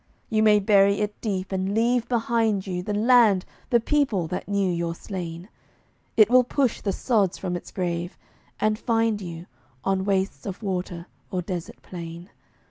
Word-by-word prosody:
You 215 -1 +3
may 210 -1 +6
bury 200 -1 +4
it 210 0 -3
deep, 195 -4 -2
and 190 +1 -1
leave 235 +1 +2
behind 225 -4 +1
you 180 -2 -3
The 205 +3 -3
land, 220 -4 +5 0.2
the 240 - +4
people, 235 - +1
that 180 - -4
knew 200 -2 +1
your 170 -1 -2
slain; 175 -2 -6 0.7
It 215 -2 +8
will 250 +2 +6
push 255 0 0
the 200 - 0
sods 200 -3 +1
from 180 -2 -3
its 175 - -7
grave, 175 -1 -3 0.4
and 215 0 +1
find 225 -3 +1
you 170 -2 -7 0.4
On 195 -1 +1
wastes 195 0 -1
of 195 +3 -6
water 180 -3 -3 0.2
or 180 -1 -2
desert 175 -2 -6
plain. 170 0 -8
195 Hz, 165 wpm, -25 LUFS, 180-220 Hz, 0.7 s, It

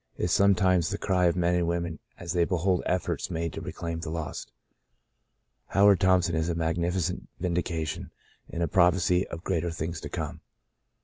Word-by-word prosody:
is 85 - -1
sometimes 95 -3 +4
the 100 - -2
cry 95 -3 +1
of 85 - +3
men 90 0 +2
and 90 -1 +1
women 85 -2 -2 0.2
as 85 0 -5
they 90 -1 +3
behold 90 +1 +1
efforts 90 -1 -1
made 85 0 -3
to - - -6
reclaim 85 -1 -5
the 85 -1 -5
lost. 80 -1 -5 1.2
Howard 100 -1 +5
Thompson 90 -2 +3
is 80 +1 0
a 85 - -1
magnificent 85 +2 -1
vindication, 85 -3 -2 0.4
and 85 - -2
a - - +1
prophecy 90 +1 +3
of 85 +1 -8
greater 85 -2 -1
things 80 0 -4
to - - -6
come. - - -5
85 Hz, 170 wpm, -27 LUFS, 85-90 Hz, 1.2 s, Howard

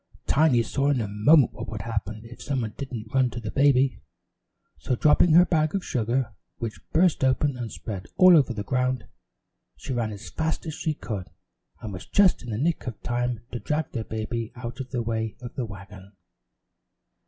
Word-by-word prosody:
Tiny 140 -6 +4
saw 135 +5 0
in 140 -3 +2
a 110 - -1
moment 110 +7 +4
what - - -7
would 110 -2 -5
happen 110 -1 -4
if 120 +1 -12
somebody 125 -7 -2
didn't 120 -6 -7
run 130 -1 +3
to 120 - -6
the 110 -2 -5
baby, 135 -1 +3 0.8
so 125 - -1
dropping 155 +5 +4
her 175 +2 +8
bag 155 -1 +1
of 195 - -2
sugar, 120 0 -1 0.2
which 110 -6 -5
burst 170 -3 +3
open 135 +1 +2
and 120 -3 -5
spread 95 +2 -6
all 185 -1 +8
over 140 -5 +4
the 105 -3 -4
ground, 125 +1 0 0.7
she 100 - -5
ran 115 -3 -1
as 100 -2 -9
fast 160 +1 -2
as 160 - -4
she 155 0 -2
could 100 -9 -5 0.5
and 105 -3 -6
was 90 - -8
just 200 -3 +4
in 125 - -9
the 105 - -2
nick 155 +2 -1
of 115 -4 -5
time 120 -1 -1
to 120 - -4
drag 155 +5 -2
the 115 - -3
baby 110 +1 -4
out 120 0 -7
of 130 -1 -5
the 120 -3 -2
way 110 -2 -2
of 120 -1 -8
the 125 - -3
wagon. 100 -1 -11
120 Hz, 195 wpm, -26 LUFS, 110-140 Hz, 0.8 s, her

